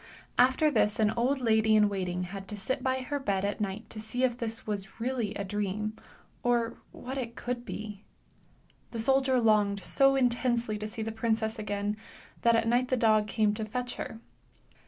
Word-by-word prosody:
After 260 +5 +5
this 210 -4 +2
an 215 -1 +4
old 255 +4 0
lady 220 -2 +4
in 210 -1 +6
waiting 180 -3 -2
had 195 +1 -7
to 210 - -6
sit 260 +7 -2
by 260 0 0
her 285 +3 -3
bed 200 -7 0
at 205 +1 -2
night 205 +2 -3
to 215 - -7
see 220 +4 -3
if 250 -2 +2
this 230 -2 -3
was 205 0 -5
really 230 -3 -1
a 200 - -2
dream, 210 +2 -2 0.5
or 235 -1 0
what 265 +2 -6
it 235 -2 -5
could 245 0 -3
be. 210 -1 -6 0.9
The 235 - -6
soldier 265 +2 +3
longed 210 -3 +3
so 275 +5 +4
intensely 240 -3 +1
to 215 - -3
see 220 +1 -4
the 225 - -3
princess 220 0 -1
again 205 0 -2 0.4
that 235 -1 +5
at 230 0 +2
night 245 +2 +3
the 255 - +1
dog 215 -2 +4
came 215 0 +2
to 220 +1 -3
fetch 245 +3 -4
her. 225 - -6
220 Hz, 190 wpm, -29 LUFS, 210-245 Hz, 0.9 s, in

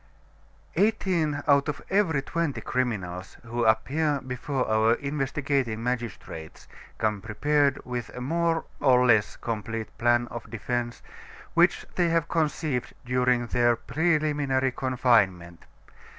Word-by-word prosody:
Eighteen 175 -7 +1
out 140 +1 +4
of 145 - -3
every 175 -9 +2
twenty 165 -2 -2
criminals 95 -8 -3
who 120 0 -2
appear 140 +7 +2
before 130 +1 -3
our 110 +1 +3
investigating 140 -5 -1
magistrates 115 -10 -5 0.3
come 105 -2 0
prepared 140 +6 +1
with 125 -2 -4
a - - -5
more 165 +5 0
or 125 -2 +4
less 110 -4 +3
complete 115 0 -4
plan 120 0 +3
of 120 -1 -8
defense, 120 +1 -3 0.5
which 175 +2 +3
they 175 -2 +3
have 165 -1 +1
conceived 155 -5 -1
during 125 -1 +2
their 120 0 +2
preliminary 145 -1 +1
confinement. 110 -10 +1
125 Hz, 115 wpm, -26 LUFS, 115-150 Hz, 0.5 s, out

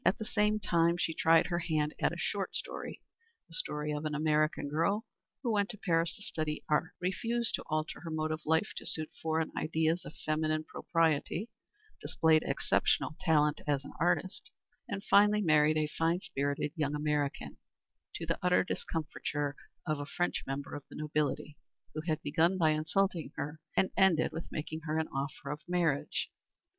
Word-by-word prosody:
At - - +3
the 220 - -5
same 210 0 +2
time 170 -3 +2
she 165 -1 0
tried 165 +1 +5
her 175 -1 -1
hand 155 -3 0
at - - +3
a - - -5
short - - -2
story - - -4 0.4
the - - -15
story 150 - -2
of 150 +1 -3
an 155 -1 -2
American 155 -1 +2
girl 170 +9 +1 0.4
who 240 - +1
went 205 -2 +2
to 210 - -6
Paris 165 -4 +1
to 205 - -10
study 155 -5 -2
art, 150 +2 +1
refused 230 +6 0
to - - -1
alter 155 0 -2
her 170 - -7
mode 155 0 -1
of 155 +1 -2
life 160 +6 +2
to - - -6
suit 155 -1 -2
foreign 160 0 0
ideas 160 +2 +1
of - - -10
female 155 0 0
propriety, 165 +6 0 0.5
displayed 160 -1 +4
exceptional 155 - +1
talent 150 -4 +3
as 140 -1 +1
an - - -9
artist, 175 +3 0 0.4
and 200 -2 -3
finally 210 +1 +5
married 155 -2 +4
a 155 - +2
fine 165 +3 0
spirited 140 -3 -2
young 150 -2 0
American, 150 -1 -1 0.6
to 165 - -4
the 165 +1 -1
utter 180 0 +4
discomfiture 145 -4 -3 0.3
of 155 -3 -1
a 145 - -5
French 175 +4 -1
member 135 +1 -4
of 145 - -5
the - - -11
nobility, 150 0 -1 0.4
who 155 - -3
had 155 -2 +1
begun 170 +5 +2
by 160 -3 +4
insulting 165 +2 0
her 150 +2 -4 0.2
and 190 - +3
ended 175 -6 +4
with 160 +1 -6
making 155 +1 -4
her 155 0 0
an 160 - 0
offer 140 +1 -4
of 150 - -4
marriage. 170 -5 0
160 Hz, 175 wpm, -32 LUFS, 150-175 Hz, 0.6 s, tried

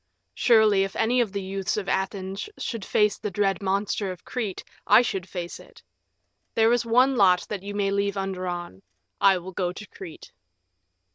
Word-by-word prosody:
Surely, 215 -4 +4
if 195 - -5
any 245 +3 +2
of 225 -5 -1
the 200 -1 -4
youths 195 0 -2
of 200 -2 -3
Athens 190 - -2
should 230 -4 -4
face 210 +1 +2
the 210 - -3
dread 195 0 0
monster 200 +1 -1
of 180 - -11
Crete, 220 -7 -4 0.2
I 245 - +7
should 190 -5 -3
face 175 -2 -6
it. - - -17 0.7
There 225 +1 +4
is 240 - +2
one 250 +4 +3
lot 185 -5 +4
that 205 -3 -4
you 205 +1 -6
may 200 -1 0
leave 200 0 0
undrawn. 180 - -4 0.4
I 195 -1 +6
will 180 +1 -8
go 180 -1 -2
to 215 +4 -9
Crete." 185 -5 -11
195 Hz, 180 wpm, -25 LUFS, 190-215 Hz, 0.7 s, I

